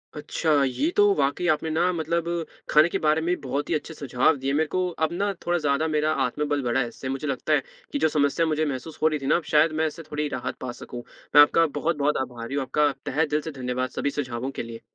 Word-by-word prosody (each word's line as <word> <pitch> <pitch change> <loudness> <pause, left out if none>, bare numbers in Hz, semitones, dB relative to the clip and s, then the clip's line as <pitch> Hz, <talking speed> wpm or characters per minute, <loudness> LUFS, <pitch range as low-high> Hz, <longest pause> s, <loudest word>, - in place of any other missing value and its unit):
अच्छा, 150 -1 +1
ये 135 - 0
तो 415 - +7
वाक़ई 140 +6 0
आपने 155 +1 -4
ना, 170 +3 +2
मतलब 170 0 -1 0.4
खाने 155 +3 +6
के - - -1
बारे 155 +1 +3
में 180 - +2
बहुत 140 +2 -3
ही - - +1
अच्छे 155 +1 -4
सुझाव 135 0 +1
दिए। 135 +1 -2
मेरे 155 +2 +2
को 185 - +2 0.2
अब 160 - -4
ना, 200 +3 0
थोड़ा 175 0 +2
ज़्यादा 150 0 +1
मेरा 155 +1 +2
आत्मबल 145 +3 -1
बढ़ा 120 +1 +1
है 120 - -1
इससे। 130 +3 -7
मुझे 135 +3 -3
लगता 135 -3 -1
है - - +3 0.3
कि 285 - -1
जो - - +4
समस्या 150 +2 +2
मुझे 155 0 0
महसूस 145 +2 -5
हो 155 - +5
रही 155 -1 0
थी 135 - -7
ना, - - +3
अब 170 - 0
शायद 155 +2 +5
मैं 160 - +3
इससे 165 +2 -7
थोड़ी 150 0 -1
राहत 125 - -4
पा 130 - -4
सकूँ। 120 0 -7 0.3
मैं 145 - +11
आपका 165 +3 +5
बहुत-बहुत 150 -2 +1
आभारी 120 0 -5
हूँ, 140 - +1
आपका 150 +2 +2
तहे 155 +5 +1
दिल 150 - +2
से 160 - -6
धन्यवाद, 130 -1 -3
सभी 140 - -2
सुझावों 130 -1 -3
के - - -1
लिए। 115 0 -9
150 Hz, 245 wpm, -25 LUFS, 135-160 Hz, 0.4 s, मैं